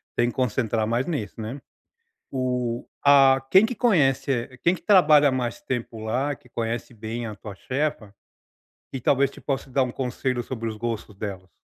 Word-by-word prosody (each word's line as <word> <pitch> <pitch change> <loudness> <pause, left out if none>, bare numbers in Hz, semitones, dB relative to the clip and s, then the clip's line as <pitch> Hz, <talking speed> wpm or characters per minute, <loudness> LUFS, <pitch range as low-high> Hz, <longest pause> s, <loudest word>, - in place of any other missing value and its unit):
tem 120 0 +2
que - - -8
concentrar 115 -3 0
mais 120 +5 0
nisso, 115 - -4
né, 120 +6 -5 0.7
o 125 -2 -2 0.2
a 135 -2 +6
quem 190 +3 +7
que 245 +2 -1
conhece, 135 - +1
quem 175 +2 +4
que - - -10
trabalha 155 -8 +6
há - - 0
mais 120 -2 -2
tempo 120 -3 -4
lá, 130 +6 -1
que 125 - -21
conhece 115 +2 -3
bem 115 +2 -5
a 105 - -6
tua 105 -1 -9
chefa 130 -4 -3 0.8
e 135 - -4
talvez 140 +2 +2
te - - -13
possa 135 -1 -3
dar 130 +1 +2
um 125 - -3
conselho 125 -1 -2
sobre 115 -3 -5
os 110 - -7
gostos 115 -2 -4
delas? 95 -3 -6
125 Hz, 180 wpm, -24 LUFS, 115-140 Hz, 0.8 s, quem